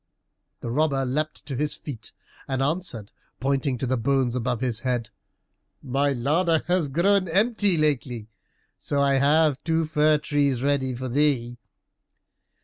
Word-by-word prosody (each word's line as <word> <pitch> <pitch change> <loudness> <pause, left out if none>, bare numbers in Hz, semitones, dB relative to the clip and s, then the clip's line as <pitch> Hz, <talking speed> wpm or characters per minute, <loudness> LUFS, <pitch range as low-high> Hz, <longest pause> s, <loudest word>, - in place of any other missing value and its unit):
The 115 - -4
robber 140 -1 +1
leapt 150 +4 -3
to 140 - -5
his 150 +3 -2
feet 135 -7 -7 0.4
and 135 0 -1
answered, 140 - -3 0.3
pointing 135 -1 0
to 125 - -3
the 130 +1 0
bones 130 +1 +1
above 125 -1 -1
his 120 -4 -1
head, 120 -3 -2 0.7
"My 140 +1 +1
larder 155 +6 +1
has 175 -3 +1
grown 185 +7 +2
empty 205 +1 +2
lately, 130 -7 -1 0.5
so 145 - -2
I 140 -1 +3
have 150 0 +3
two 165 -1 +1
fir 155 0 +3
trees 140 -4 0
ready 135 -3 0
for 130 +2 -5
thee." 125 -3 0
140 Hz, 140 wpm, -25 LUFS, 125-155 Hz, 0.7 s, I